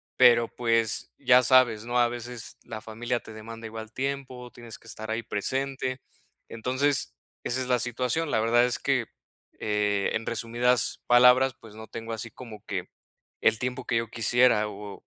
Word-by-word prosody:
pero 120 -1 +6
pues 115 -2 0
ya 125 -2 +5
sabes, 120 -4 +4
¿no?, 120 +1 -1
a 120 -1 +5
veces 120 -1 -7
la 110 -2 -8
familia 120 +2 -3
te 110 - -12
demanda 115 +1 -9
igual 110 0 -8
tiempo, 130 -1 -4
tienes 115 -2 -10
que - - -24
estar 110 0 -6
ahí 115 +1 -2
presente. 130 +4 -2 0.5
Entonces 130 +4 0 0.3
esa 130 +2 0
es 130 - -3
la 125 -1 +3
situación. 125 +7 -1
La 110 - +2
verdad 120 +2 +4
es 120 -1 0
que, - - 0 0.5
eh, 105 -1 0
en 115 - -2
resumidas 120 +2 0
palabras, 125 +1 +6
pues 110 -2 -14
no 110 0 -9
tengo 115 0 -7
así 115 0 -5
como 110 -5 -11
que - - -4 0.5
el 110 0 +3
tiempo 125 0 -3
que 115 - 0
yo 115 0 -1
quisiera 115 -1 +3
o 105 -1 -9
120 Hz, 170 wpm, -27 LUFS, 110-125 Hz, 0.5 s, pero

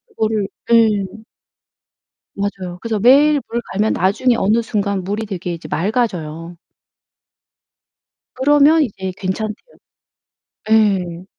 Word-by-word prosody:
그거를 215 -2 0 0.2
네. 215 -4 +3 1.2
맞아요. 190 -3 -4
그래서 225 0 -2
매일 285 +6 +5
물 235 +1 -2
갈면 210 +3 +1
나중에 210 +7 +1
어느 220 +2 +2
순간 200 -3 -2
물이 205 +4 -3
되게 180 -3 -5
이제 165 - -9
맑아져요. 170 -5 -2 1.8
그러면 290 +4 +4
이제 190 -7 -4
괜찮대 205 +3 -3 1.2
예. 190 -5 +2
210 Hz, 215 characters per minute, -18 LUFS, 185-230 Hz, 1.8 s, 매일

